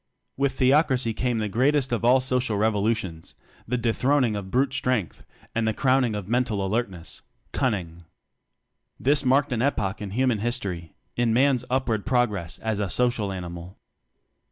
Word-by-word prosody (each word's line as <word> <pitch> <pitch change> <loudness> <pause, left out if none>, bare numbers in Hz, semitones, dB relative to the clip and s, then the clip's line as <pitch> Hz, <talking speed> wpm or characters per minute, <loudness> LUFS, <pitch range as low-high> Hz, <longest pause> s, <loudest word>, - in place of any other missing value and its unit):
With 140 -1 0
theocracy 130 -3 +2
came 120 +1 -1
the 110 -1 -1
greatest 130 +5 +1
of 120 -1 -1
all 125 +3 +5
social 125 -4 0
revolutions; 105 -5 -1 0.3
the 125 +3 0
dethron 125 +4 +2
ing 110 -3 -1
of 100 -2 -5
brute 130 +4 +1
strength 125 -9 -2 0.3
and 115 -1 0
the 110 - 0
crown 130 0 +3
ing 115 -4 -1
of 100 -3 -5
mental 115 -4 0
alertness 95 -5 -3 0.3
Cunning. 90 -8 -2 1.0
This 145 +2 +3
marked 140 +2 +2
an 115 - -1
epoch 105 -8 -1
in 105 - -5
human 120 +1 +1
his 120 +4 0
tory, 90 -7 -6 0.2
in 120 -2 +1
man's 130 0 +3
upward 125 -5 0
progress 115 -9 0
as 110 -2 -3
a 100 -2 -1
social 120 -3 +1
animal. 90 0 -7
115 Hz, 160 wpm, -25 LUFS, 100-130 Hz, 1.0 s, all